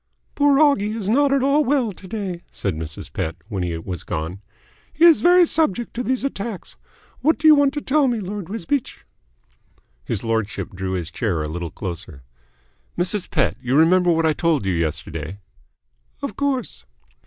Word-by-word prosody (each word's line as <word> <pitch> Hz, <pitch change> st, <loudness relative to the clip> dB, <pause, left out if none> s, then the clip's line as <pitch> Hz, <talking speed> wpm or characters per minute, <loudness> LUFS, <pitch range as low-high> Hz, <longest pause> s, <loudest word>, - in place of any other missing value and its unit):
"Poor 285 Hz, -1 st, +4 dB
Oggie 250 Hz, -8 st, +3 dB
is 210 Hz, -4 st, -4 dB
not 280 Hz, +5 st, +3 dB
at 275 Hz, -1 st, +2 dB
all 280 Hz, +2 st, +3 dB
well 260 Hz, -5 st, +1 dB
to 190 Hz, 0 st, -13 dB
day," 190 Hz, -5 st, -4 dB
said 100 Hz, -, -2 dB
Mrs. 80 Hz, 0 st, -7 dB
Pett, 80 Hz, -, -2 dB
when 100 Hz, -5 st, -3 dB
he 85 Hz, -2 st, -2 dB
was 85 Hz, 0 st, -6 dB
gone. 80 Hz, +5 st, -4 dB, 0.5 s
"He 325 Hz, -, +4 dB
is 335 Hz, -3 st, +7 dB
very 355 Hz, 0 st, +6 dB
subject 240 Hz, -, 0 dB
to 240 Hz, -, -3 dB
these 255 Hz, +1 st, -1 dB
attacks. 225 Hz, -7 st, -5 dB, 0.4 s
What 315 Hz, +5 st, +2 dB
do 315 Hz, -, +2 dB
you 310 Hz, -, +10 dB
want 285 Hz, -2 st, +4 dB
to 295 Hz, -, -2 dB
tell 285 Hz, 0 st, +2 dB
me, 240 Hz, -3 st, 0 dB
Lord 195 Hz, -2 st, -5 dB
Wisbeach?" 245 Hz, +5 st, -3 dB, 1.0 s
His 100 Hz, -, -3 dB
lordship 110 Hz, -2 st, -2 dB
drew 95 Hz, 0 st, -4 dB
his 90 Hz, -2 st, -3 dB
chair 90 Hz, -9 st, -1 dB
a -, -, -3 dB
little 85 Hz, +2 st, -4 dB
closer. 85 Hz, -, -7 dB, 0.7 s
"Mrs. 185 Hz, +2 st, -1 dB
Pett, 130 Hz, -, +1 dB
you 125 Hz, +1 st, 0 dB
remember 175 Hz, +3 st, +5 dB
what 165 Hz, -1 st, +2 dB
I 160 Hz, -, +3 dB
told 160 Hz, -, +1 dB
you 95 Hz, -, +1 dB
yesterday?" 80 Hz, +1 st, -3 dB, 0.9 s
"Of 280 Hz, -, -3 dB
course." 270 Hz, -, -2 dB
180 Hz, 175 wpm, -22 LUFS, -, 1.0 s, you